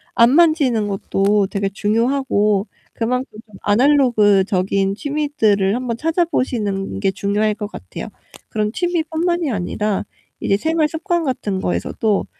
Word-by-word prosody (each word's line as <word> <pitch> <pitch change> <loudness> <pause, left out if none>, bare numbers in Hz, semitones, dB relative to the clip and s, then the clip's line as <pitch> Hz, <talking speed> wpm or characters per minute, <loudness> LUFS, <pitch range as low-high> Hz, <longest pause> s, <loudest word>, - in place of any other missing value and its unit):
안 235 +2 +6
만지는 290 -9 +3
것도 200 +1 +1
되게 195 0 -2
중요하고 215 -1 +1 0.3
그만큼 250 -1 -2
좀 210 -3 -17
아날로그적인 205 -6 +3
취미들을 225 -9 +1
한번 245 -2 -2
찾아보시는 250 - -1
게 195 - +2
중요할 205 +2 0
것 210 -2 -5
같아요. 90 - -8 0.4
그런 210 -1 -1
취미 350 -2 0
뿐만이 330 -1 -1
아니라 205 +1 -2 0.3
이제 195 - +1
생활 315 +4 +1
습관 335 +1 -2
같은 210 -8 -2
거에서도 145 - -1
215 Hz, 305 characters per minute, -19 LUFS, 200-290 Hz, 0.4 s, 안